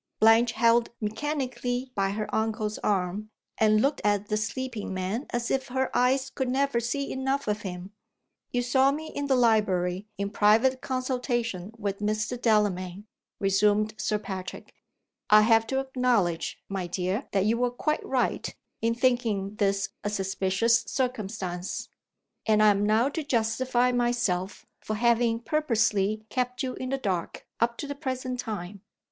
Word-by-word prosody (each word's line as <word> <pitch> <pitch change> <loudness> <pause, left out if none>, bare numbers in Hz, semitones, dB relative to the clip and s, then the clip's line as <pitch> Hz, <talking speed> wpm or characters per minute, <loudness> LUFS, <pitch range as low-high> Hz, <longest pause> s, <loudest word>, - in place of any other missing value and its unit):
Blanche 225 +2 +5
held 230 +1 +3
mechanically 255 +1 -2
by 195 -3 0
her 210 +1 -3
uncle's 215 -1 -1
arm, 200 +1 -1 0.3
and 215 -1 +4
looked 280 +1 +1
at 205 0 +1
the 210 - +1
sleeping 225 0 -3
man 190 +8 -3
as 240 0 -2
if 265 0 0
her 260 +1 -2
eyes 260 +2 +2
could 265 -2 -2
never 270 -1 +1
see 275 +4 -2
enough 265 0 -1
of 210 0 -1
him. 180 0 -6 0.6
"You 245 0 0
saw 265 +2 +4
me 315 +2 -5
in 285 0 -3
the 270 - +3
library 205 -5 +2
in 200 0 -2
private 225 +6 +3
consultation 245 -6 -2
with 200 -2 -3
Mr. 215 +4 -1
Delamayn," 205 -4 +1 0.3
resumed 210 +2 +2
Sir 210 - 0
Patrick. 190 -3 -7 0.6
"I 215 0 +8
have 225 +1 +4
to 265 +2 0
acknowledge, 250 -11 0
my 190 -2 -3
dear, 185 +7 -2
that 195 -1 +1
you 230 +2 +2
were 245 0 +2
quite 305 +5 -1
right 260 -2 -1 0.3
in 230 0 +1
thinking 230 -6 +1
this 195 -1 +1
a 205 - -1
suspicious 195 +3 +1
circumstance, 200 -8 -3 0.6
And 215 -1 +4
I 215 - +7
am 205 0 +2
now 225 +5 +3
to 320 +3 -3
justify 245 0 +1
myself 235 -7 0
for 215 - -4
having 235 0 +2
purposely 220 -6 +1
kept 250 +1 -1
you 255 -1 -2
in 255 - -5
the 270 - 0
dark 190 -9 -3
up 235 0 +1
to - - -4
the 285 - -4
present 255 -2 -4
time." 205 -4 -5
225 Hz, 155 wpm, -27 LUFS, 205-255 Hz, 0.6 s, I